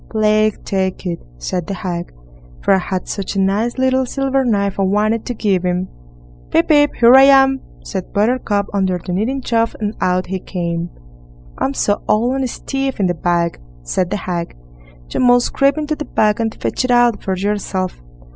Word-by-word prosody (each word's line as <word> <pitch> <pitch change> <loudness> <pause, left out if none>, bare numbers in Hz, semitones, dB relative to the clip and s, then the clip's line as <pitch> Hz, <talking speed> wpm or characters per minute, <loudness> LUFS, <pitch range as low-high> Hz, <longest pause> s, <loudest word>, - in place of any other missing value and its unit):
"Plague 215 -1 +1
take 190 -1 -2
it", 170 -2 -3 0.2
said 175 - -3
the 195 - -3
hag, 175 -4 -4 0.5
"for - - +4
I 190 - +4
had 185 0 -4
such 200 0 -4
a - - 0
nice 205 +6 0
little 260 0 +2
silver 270 0 0
knife 200 -5 0
I - - +2
wanted 210 +3 +1
to 245 - -3
give 200 -4 +1
him." 180 +1 -1 0.6
"Pip, 165 - +2
pip! 290 -2 +4
here 235 +1 +7
I 265 - +9
am", 270 -1 +5 0.2
said 190 -2 -5
Buttercup 210 -1 +1
under 190 -2 +1
the 180 +1 -6
kneading 240 +9 -1
trough, 230 -1 0
and 210 -1 -2
out 180 0 +1
he 190 +1 -4
came. 170 -2 -3 0.7
"I'm 135 - -1
so 205 0 0
old, 235 +4 +2
and 265 -2 -1
stiff 270 +1 -3
in 195 - +2
the 175 - +1
back", 170 0 0 0.2
said 175 - -1
the - - -1
hag, 175 -3 -4 0.6
"you - - -1
must 245 -1 +3
creep 275 +2 +3
into 305 0 -1
the 300 - -6
bag 210 -3 +1
and 225 -1 -2
fetch - - -1
it 255 - -2
out 240 -3 +3
for 190 -1 -2
yourself." 190 - -2
205 Hz, 190 wpm, -18 LUFS, 185-245 Hz, 0.7 s, I